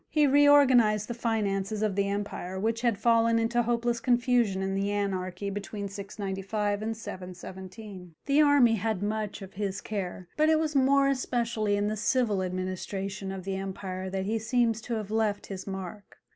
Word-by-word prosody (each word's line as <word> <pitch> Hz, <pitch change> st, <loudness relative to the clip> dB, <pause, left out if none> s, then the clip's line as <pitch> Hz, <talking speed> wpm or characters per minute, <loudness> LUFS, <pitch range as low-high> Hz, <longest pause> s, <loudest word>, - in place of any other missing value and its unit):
He 300 Hz, -1 st, +3 dB
reorganized 265 Hz, -7 st, +5 dB
the 240 Hz, -, -3 dB
finances 215 Hz, -3 st, -1 dB
of 210 Hz, -3 st, 0 dB
the 200 Hz, 0 st, +1 dB
empire, 200 Hz, -2 st, -4 dB
which 225 Hz, +3 st, -1 dB
had 235 Hz, -4 st, +1 dB
fallen 230 Hz, 0 st, +3 dB
into 230 Hz, +1 st, +2 dB
hopeless 235 Hz, 0 st, 0 dB
confusion 240 Hz, -5 st, +2 dB
in 195 Hz, 0 st, -1 dB
the 195 Hz, +1 st, 0 dB
anarchy 195 Hz, -1 st, -2 dB
between 205 Hz, 0 st, -5 dB
695 200 Hz, +1 st, -3 dB
and 220 Hz, 0 st, -3 dB
717. 185 Hz, -1 st, -9 dB
The 285 Hz, +2 st, +4 dB
army 280 Hz, -6 st, +5 dB
had 210 Hz, -1 st, -1 dB
much 210 Hz, -1 st, -3 dB
of 190 Hz, -, -11 dB
his 195 Hz, -1 st, -3 dB
care, 185 Hz, -3 st, -5 dB
but 310 Hz, +1 st, +4 dB
it 315 Hz, -, +5 dB
was 310 Hz, -1 st, -1 dB
more 275 Hz, +1 st, +4 dB
especially 235 Hz, -5 st, 0 dB
in 205 Hz, 0 st, 0 dB
the 215 Hz, -, -1 dB
civil 215 Hz, -2 st, +1 dB
administration 190 Hz, +2 st, -4 dB
of 190 Hz, -1 st, -6 dB
the 190 Hz, 0 st, -3 dB
empire 190 Hz, -1 st, -5 dB
that 190 Hz, 0 st, -3 dB
he 220 Hz, +2 st, 0 dB
seems 230 Hz, 0 st, +1 dB
to 235 Hz, +1 st, -3 dB
have 215 Hz, -2 st, -5 dB
left 215 Hz, -2 st, 0 dB
his 190 Hz, -1 st, -7 dB
mark. 195 Hz, +1 st, -7 dB
210 Hz, 170 wpm, -28 LUFS, 195-235 Hz, -, reorganized